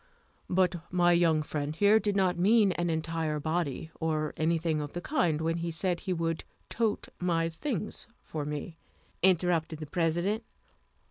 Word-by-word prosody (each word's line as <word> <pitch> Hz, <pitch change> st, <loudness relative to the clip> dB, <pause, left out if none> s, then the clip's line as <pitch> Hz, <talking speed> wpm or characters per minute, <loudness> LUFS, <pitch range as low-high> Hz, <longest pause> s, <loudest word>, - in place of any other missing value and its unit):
"But 180 Hz, -1 st, +2 dB
my 175 Hz, -1 st, +4 dB
young 165 Hz, -3 st, +3 dB
friend 150 Hz, 0 st, -3 dB
here 205 Hz, +5 st, +5 dB
did 205 Hz, -2 st, -1 dB
not 185 Hz, -2 st, +2 dB
mean 200 Hz, +3 st, +4 dB
an 175 Hz, -1 st, -1 dB
entire 160 Hz, -1 st, -1 dB
body, 160 Hz, 0 st, -2 dB
or 155 Hz, -2 st, -1 dB
anything 160 Hz, -1 st, +1 dB
of 145 Hz, -1 st, -6 dB
the 175 Hz, -, -3 dB
kind, 175 Hz, -, +1 dB
when 165 Hz, +1 st, 0 dB
he 170 Hz, 0 st, -2 dB
said 175 Hz, +1 st, 0 dB
he 195 Hz, -, -4 dB
would 165 Hz, -1 st, -1 dB, 0.3 s
tote 220 Hz, -2 st, -1 dB
my 165 Hz, -2 st, +1 dB
things 215 Hz, -, -4 dB, 0.2 s
for 155 Hz, -2 st, -4 dB
me," 150 Hz, +3 st, -5 dB, 0.4 s
interrupted 175 Hz, -3 st, +2 dB
the 155 Hz, -, -6 dB
President. 175 Hz, +8 st, 0 dB
170 Hz, 155 wpm, -29 LUFS, 160-180 Hz, 0.4 s, here